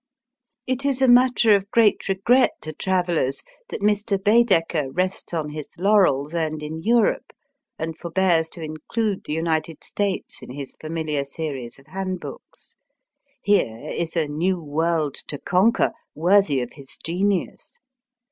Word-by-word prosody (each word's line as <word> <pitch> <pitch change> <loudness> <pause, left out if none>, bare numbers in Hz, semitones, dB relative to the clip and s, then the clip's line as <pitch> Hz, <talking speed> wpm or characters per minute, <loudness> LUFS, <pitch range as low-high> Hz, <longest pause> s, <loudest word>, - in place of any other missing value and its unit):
It 260 +1 -2
is 275 -2 0
a - - +5
matter 245 -2 +5
of 200 0 +1
great 225 -4 +3
regret 240 +7 +3
to 155 - -6
travellers 175 -6 0 0.3
that - - -5
Mr. 205 0 +2
Baedeker 190 - +2
rests 185 +4 -2
on 160 -3 -2
his 150 -1 -6
laurels 175 -7 +3
earned 155 -2 -2
in 155 +1 -5
Europe, 230 +5 +2 0.5
and 160 0 -4
forbears 170 -1 +1
to 170 - -7
include 190 +7 -3
the 150 - -3
United 160 -1 -2
States 200 -2 -2
in - - -11
his 135 +1 -7
familiar 155 -2 -2
series 140 -4 -6
of 135 - -19
handbooks. 185 +2 -7 0.7
Here 155 - +2
is 170 0 -3
a 160 -2 +1
new 175 +5 0
world 155 -1 0
to 145 - -3
conquer, 190 +10 +2 0.2
worthy 170 -4 +3
of 125 - -6
his 140 -2 -11
genius. 190 - -2
170 Hz, 140 wpm, -23 LUFS, 155-200 Hz, 0.7 s, a